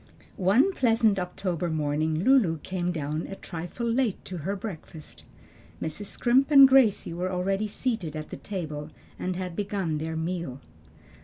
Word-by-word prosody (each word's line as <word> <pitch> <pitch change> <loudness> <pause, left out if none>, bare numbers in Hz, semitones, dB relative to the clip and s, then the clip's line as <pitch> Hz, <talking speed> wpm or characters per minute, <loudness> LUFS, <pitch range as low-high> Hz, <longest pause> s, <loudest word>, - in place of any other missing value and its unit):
One 220 - +4
pleasant 225 - +3
October 180 -1 -2
morning 155 +1 0
Lulu 230 -11 +4
came 180 -1 -2
down 155 -1 -3
a 195 - -6
trifle 175 +6 -6
late 235 -2 0
to 185 - -6
her 185 +6 -3
breakfast. 170 -6 -9 0.5
Mrs. 160 +6 -4
Scrimp 255 +6 +2
and 275 -2 +9
Gracie 260 -10 +4
were 180 +2 -2
already 195 +3 0
seated 210 - -2
at 155 0 -6
the - - -5
table 155 -6 -5 0.3
and 185 0 -2
had 180 -2 -4
began 195 -6 -2
their 160 +1 -3
meal. 165 -5 -3
185 Hz, 150 wpm, -27 LUFS, 160-215 Hz, 0.5 s, and